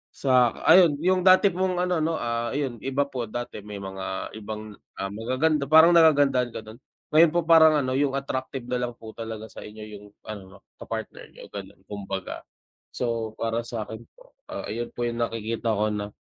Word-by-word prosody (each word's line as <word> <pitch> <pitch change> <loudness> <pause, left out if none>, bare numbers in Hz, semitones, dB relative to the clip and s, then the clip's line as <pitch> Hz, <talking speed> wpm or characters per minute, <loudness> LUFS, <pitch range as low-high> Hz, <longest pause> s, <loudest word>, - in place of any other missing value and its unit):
sa 125 -3 +3
ayun 170 -6 +7
yung 185 0 +3
dati 185 +1 +6
mong 185 +1 -1
ano 180 -2 +1
'no, 160 +1 0
ah, 115 -2 -2
ayun 135 -5 -2
iba 135 +4 0
po 125 -4 -4
dati 120 0 -6
may 105 -1 -7
mga 95 0 -5
ibang, 110 0 -7 0.3
ah, 95 - -2
magaganda 130 +7 0
parang 160 +3 +7
nagagandahan 145 -7 +4
ka - - -4
dun, 110 +1 -12 0.3
ngayon 155 +1 +6
po 175 - +2
parang 160 -1 +6
ano 130 - -2
yung 140 -1 +1
attractive 130 -1 -4
nalang 125 -1 -2
po 110 -1 -11
talaga 110 -1 -7
sa - - -11
inyo 105 +1 -10 0.2
yung 105 - -15 0.2
ano 100 -3 -10 0.2
ka - - -9
partner - - -6
niyo - - -13
ganun 100 -1 -9
kumbaga. 95 -2 -6 0.5
So 115 -3 -3
para 115 +1 -1
sakin 110 -1 -6 0.2
po, - - -20 0.2
ah, - - -5
ayun 120 +2 -4
po 120 0 -1
yung 120 0 -3
nakikita 115 0 -2
ko 105 +1 +1
na, 105 0 -4
120 Hz, 185 wpm, -25 LUFS, 110-145 Hz, 0.5 s, ayun